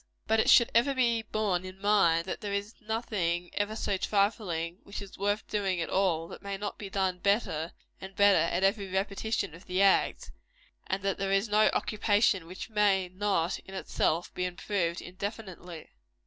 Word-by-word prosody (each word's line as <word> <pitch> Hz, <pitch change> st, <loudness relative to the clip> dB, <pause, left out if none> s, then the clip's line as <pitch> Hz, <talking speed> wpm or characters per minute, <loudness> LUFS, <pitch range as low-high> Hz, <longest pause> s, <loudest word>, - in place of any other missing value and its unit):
But 220 Hz, +1 st, +2 dB
it -, -, +3 dB
should 235 Hz, -, +6 dB
ever 255 Hz, +4 st, +3 dB
be 235 Hz, -3 st, +2 dB
borne 210 Hz, -4 st, -1 dB
in 185 Hz, +1 st, -9 dB
mind, 195 Hz, -5 st, +3 dB
that 185 Hz, -, -5 dB
there 205 Hz, -, -4 dB
is 205 Hz, +2 st, -3 dB
nothing 200 Hz, -6 st, -2 dB
ever 205 Hz, +1 st, -1 dB
so 200 Hz, -3 st, -1 dB
trifling, 190 Hz, -4 st, 0 dB
which 200 Hz, -, -7 dB
is 200 Hz, -2 st, -10 dB
worth 205 Hz, +2 st, -1 dB
doing 195 Hz, -4 st, -1 dB
at 165 Hz, -, -3 dB
all, 175 Hz, -4 st, +1 dB
that -, -, -10 dB
may 200 Hz, -1 st, -4 dB
not 205 Hz, +1 st, -5 dB
be 200 Hz, -, -6 dB
done 190 Hz, -2 st, -1 dB
better 180 Hz, -5 st, 0 dB, 0.3 s
and 190 Hz, 0 st, -9 dB
better 200 Hz, -3 st, +5 dB
at 180 Hz, +2 st, 0 dB
every 195 Hz, 0 st, +1 dB
repetition 200 Hz, 0 st, -2 dB
of 170 Hz, +3 st, -14 dB
the 185 Hz, +2 st, +2 dB
act; 195 Hz, -, +2 dB, 0.6 s
and 190 Hz, +1 st, -2 dB
that 195 Hz, -1 st, -1 dB
there 195 Hz, 0 st, -1 dB
is 195 Hz, +3 st, +2 dB
no 215 Hz, +1 st, +4 dB
occupation 205 Hz, -4 st, +1 dB
which 185 Hz, +2 st, -7 dB
may 205 Hz, -4 st, +2 dB
not, 185 Hz, -2 st, 0 dB
in 195 Hz, -, -11 dB
itself, 175 Hz, -2 st, -1 dB
be 180 Hz, -, -3 dB
improved 180 Hz, -1 st, -2 dB
indefinitely. 185 Hz, -3 st, -7 dB
195 Hz, 180 wpm, -29 LUFS, 180-210 Hz, 0.6 s, should